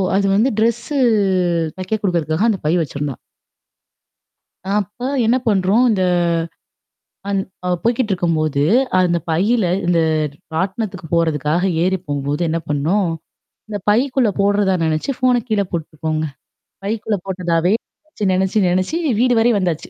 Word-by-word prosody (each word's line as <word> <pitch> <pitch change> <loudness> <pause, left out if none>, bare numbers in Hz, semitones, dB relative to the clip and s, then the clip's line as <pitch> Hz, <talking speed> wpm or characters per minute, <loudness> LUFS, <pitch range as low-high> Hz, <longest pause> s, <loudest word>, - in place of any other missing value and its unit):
அது 200 0 +2
வந்து 225 +6 +3
டிரெஸ்ஸு 235 +6 0 0.8
தைக்க 185 +3 -4
குடுக்கறதுக்காக 170 +1 0
அந்த 200 - -3
பை 155 - +2
வச்சுருந்தா. 145 -1 -4 1.6
அப்ப 210 +2 -4 0.3
என்ன 235 +3 +3
பண்றோம் 205 +3 +3
இந்த 190 -3 +1 1.3
அந் 200 -1 +1 0.3
அவள் 180 -1 0
போய்கிட்ருக்கும்போது, 175 - 0 0.4
அந்த 180 -2 +3
பையில 200 +7 +2 0.2
இந்த 175 -1 +2 0.5
ராட்டனத்துக்கு 190 +1 -3
போறதுக்காக 160 0 +1 0.2
ஏறி 190 +1 +1
போகும்போது 145 +2 -2
என்ன 165 +1 0
பண்ணோம்? 165 +7 +1 0.6
இந்த 210 -1 -3
பைக்குள்ள 250 +2 +2
போடுறதா 200 -1 +2
நெனச்சு, 155 - -1
ஃபோன 250 -2 +2
கீழ 215 -3 +1
போட்டுருக்கோங்க. 155 -1 -3 0.6
பைக்குள்ள 210 0 -1
போட்டதாவே 180 -1 0 0.3
நெனச்சு 310 -9 -5
நெனச்சு 190 +2 +1
நெனச்சு 185 - 0 0.2
வீடு 250 +1 +3
வரை 235 +2 +4
வந்தாச்சு. 175 -5 -2
185 Hz, 120 wpm, -19 LUFS, 165-215 Hz, 1.6 s, வரை